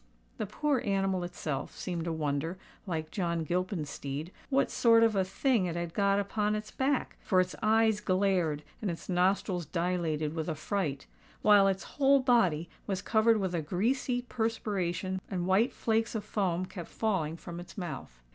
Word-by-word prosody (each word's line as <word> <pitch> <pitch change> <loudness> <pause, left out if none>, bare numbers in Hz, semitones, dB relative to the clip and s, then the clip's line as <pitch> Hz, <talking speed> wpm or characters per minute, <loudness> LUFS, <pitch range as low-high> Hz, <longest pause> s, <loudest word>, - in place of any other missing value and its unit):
The 215 - -2
poor 275 +5 0
animal 195 -2 0
itself 155 -6 -4
seemed 170 -3 -3
to 170 - -1
wonder, 155 +2 -2 0.3
like 160 -3 -3
John 170 -4 -1
Gilpin's 175 -2 -2
steed, 145 +6 -5 0.2
what 275 0 +2
sort 230 -1 +5
of 225 -2 +3
a 190 - +3
thing 200 +1 +1
it 170 - -3
had 170 -1 -3
got 200 0 +3
upon 210 +1 0
its 215 0 -5
back; 270 0 0
for 185 - +2
its 185 0 +1
eyes 220 0 +3
glared, 185 -6 +1 0.2
and 210 - -1
its 170 - -6
nostrils 180 -1 +1
dilated 165 -3 -1
with 160 0 -3
affright: 155 -2 -2 0.4
while 205 -2 +7
its 195 -1 0
whole 275 -1 +3
body 220 - +3 0.2
was 195 -1 -2
covered 225 0 +4
with 190 -3 -1
a 170 - 0
greasy 245 - 0
perspiration, 195 -6 -2
and 180 -2 -2
white 190 +6 +3
flakes 225 0 0
of 215 - -2
foam 185 -4 0
kept 180 -3 -8
falling 175 -8 -1
from 170 0 -8
its 175 - -11
mouth. 135 - -6
185 Hz, 170 wpm, -30 LUFS, 170-215 Hz, 0.4 s, while